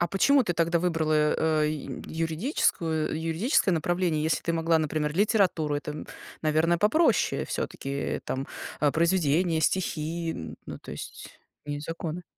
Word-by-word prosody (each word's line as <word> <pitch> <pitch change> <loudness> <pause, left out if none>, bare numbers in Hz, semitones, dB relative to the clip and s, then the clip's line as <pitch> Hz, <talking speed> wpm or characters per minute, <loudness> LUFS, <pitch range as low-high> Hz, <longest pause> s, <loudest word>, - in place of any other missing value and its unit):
А 175 - +1
почему 275 +8 +4
ты 175 - 0
тогда 170 0 +2
выбрала, 155 -2 +2
э, - - +2
ю 150 -3 -6
юридическую 160 - 0
юридическое 180 - +2
направление, 170 -1 0
если 160 +1 0
ты 170 - -1
могла, 165 0 +2
например, 150 -1 -1
литературу? 185 -7 +2
Это, 150 +1 -4
м, 150 - -7 0.4
наверно, 160 +2 +2
попроще 225 - +3
всё-таки, 140 +1 -3
там, 135 +1 -3 0.3
а, 145 -1 +4
произведения, 170 -1 +2
стихи, 165 -1 -1
н 80 - -7
ну, - - -7
то - - -11
есть, - - -9 0.3
не 145 0 -4
законы. 165 +2 -5
165 Hz, 145 wpm, -27 LUFS, 155-175 Hz, 0.4 s, почему